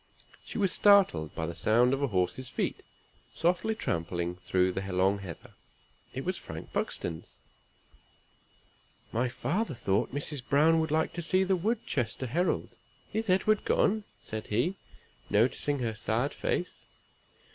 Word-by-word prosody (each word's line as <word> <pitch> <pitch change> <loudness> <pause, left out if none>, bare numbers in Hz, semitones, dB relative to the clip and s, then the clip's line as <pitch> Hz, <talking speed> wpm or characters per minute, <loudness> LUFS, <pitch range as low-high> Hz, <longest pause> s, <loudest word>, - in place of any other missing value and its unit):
She - - -7
was 195 -4 +2
startled 190 - +5
by 80 - -2
the 85 - -4
sound 115 +8 +3
of 135 - -1
a 140 - +2
horse's 100 +5 -1
feet, - - -2 0.5
softly 180 +6 +1
trampling 85 - -2
through 90 +1 +1
the 95 - -3
long 95 +2 +2
heather. 90 -5 -9 0.6
It - - -5
was - - -1
Frank - - -9
Buxton's. 80 -2 -4 1.7
"My 120 +2 0
father 180 - -1
thought 100 -4 0
Mrs. 145 0 -3
Browne 155 +5 +4
would 160 0 0
like 160 +1 +1
to 175 - -4
see 185 +3 +2
the 190 0 +2
Woodchester 180 - -1
Herald. 170 +9 0 0.4
Is 220 -1 -1
Edward 195 +3 +3
gone?" 215 +1 +2 0.2
said 110 0 -6
he, 120 - +1 0.6
noticing 125 +7 +2
her 120 -4 -1
sad 110 +5 -1
face. 180 - -2
130 Hz, 140 wpm, -30 LUFS, -, 1.7 s, startled